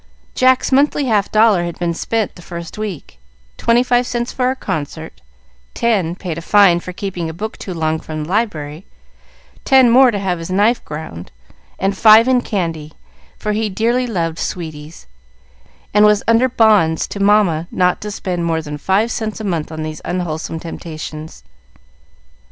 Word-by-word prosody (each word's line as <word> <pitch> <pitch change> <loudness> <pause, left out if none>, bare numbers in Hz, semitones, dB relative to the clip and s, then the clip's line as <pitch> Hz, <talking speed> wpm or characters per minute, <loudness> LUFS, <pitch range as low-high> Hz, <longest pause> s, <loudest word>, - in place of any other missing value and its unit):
Jack's 255 +1 +3
monthly 285 +1 +2
half 210 -5 +1
dollar 215 -4 +4
had 170 -1 -5
been 170 -1 -1
spent 220 +4 -2
the 175 - -14
first 170 -1 -8
week, 195 - -7 0.4
twenty 235 +1 +2
five 245 0 +1
cents 240 +1 -3
for 250 -1 0
a 260 - -1
concert, 160 - -5 0.5
ten 195 -8 0
paid 175 -4 -5
a - - -8
fine 190 -1 +4
for 180 - -8
keeping 180 -3 -4
a 160 - -8
book 215 +5 -5
too 190 - -8
long 160 -2 -1
from 155 -1 -6
the 155 - -8
library, 165 -7 -2 0.8
ten 260 -3 +5
more 260 +2 +7
to 215 - -1
have 185 -3 -2
his 165 - -7
knife 205 +6 +2
ground, 150 - -8 0.5
and 195 +1 -1
five 220 +3 +7
in 255 -1 +3
candy, 165 -8 -3 0.4
for 210 - -3
he 215 +1 -1
dearly 235 +6 0
loved 165 -6 -2
sweeties, 155 - -6 0.9
and 210 0 +5
was 210 -1 +4
under 230 +3 +4
bonds 210 -9 +3
to 200 - -7
Mamma 200 -5 +3
not 180 0 +1
to 210 - -5
spend 180 -4 -3
more 165 -1 -1
than 150 -1 -7
five 200 +8 +1
cents 220 -1 -4
a - - -6
month 170 -6 -2
on 155 0 -5
these 155 0 -6
unwholesome 165 -2 -3
temptations. 155 -2 -8
190 Hz, 170 wpm, -17 LUFS, 160-220 Hz, 0.9 s, more